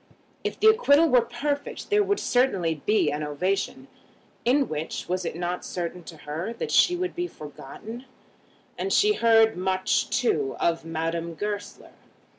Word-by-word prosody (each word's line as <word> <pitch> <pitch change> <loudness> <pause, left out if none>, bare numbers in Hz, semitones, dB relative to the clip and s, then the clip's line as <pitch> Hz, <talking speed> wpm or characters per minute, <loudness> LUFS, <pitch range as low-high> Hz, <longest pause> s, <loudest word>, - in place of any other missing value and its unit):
If - - -3
the - - 0
acquittal 330 -9 +5
were 250 -2 +5
perfect, 285 - -4
there 415 0 +5
would 405 0 0
certainly 180 - +1
be 210 -8 +3
an 150 +1 -3
ovation, 150 -2 -2 0.6
in 270 +3 +3
which, 155 +1 -4
was 180 0 -2
it - - -3
not 175 +1 -3
certain 175 0 -5
to 165 - -10
her, 165 +9 -4
that 460 - -5
she 355 - +5
would 365 0 -2
be 355 0 -2
forgotten? 220 - -10 0.7
And 390 - -2
she 420 +2 +4
heard 225 - +4
much, 185 +1 0
too, 420 -2 0
of 165 -1 +1
Madame 165 +1 -3
Goesler. 205 +2 -5
205 Hz, 155 wpm, -25 LUFS, -, 0.7 s, acquittal